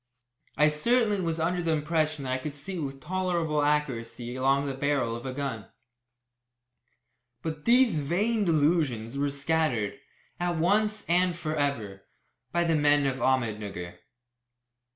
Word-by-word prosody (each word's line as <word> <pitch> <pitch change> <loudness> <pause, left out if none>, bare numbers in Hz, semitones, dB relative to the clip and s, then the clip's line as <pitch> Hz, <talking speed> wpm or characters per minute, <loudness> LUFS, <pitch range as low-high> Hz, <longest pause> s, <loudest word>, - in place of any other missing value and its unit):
I 150 +1 +5
certainly 210 +6 +2
was 165 -2 -1
under 175 +2 0
the 165 -1 +1
impression 155 -1 0
that 130 - -3
I 130 - +1
could 145 +2 -6
see 180 +6 -4
with 135 -3 -5
tolerable 170 -2 0
accuracy 125 -5 -1
along 135 +2 +2
the 140 - -2
barrel 135 -4 0
of 120 +3 -6
a - - -3
gun. 130 -5 -4 1.8
But 155 -2 -5
these 240 -8 +5
vain 205 +10 +1
delusions 145 - +1
were 140 +1 0
scattered, 140 -5 -1 0.4
at 175 -1 -1
once 210 +5 +1
and 180 +1 +2
for 155 -2 -3
ever, 115 -10 -2 0.5
by 175 0 +2
the 165 -1 +1
men 145 -1 +3
of 135 -1 0
Ahmednugger. 105 -9 -1
150 Hz, 140 wpm, -28 LUFS, 130-170 Hz, 1.8 s, I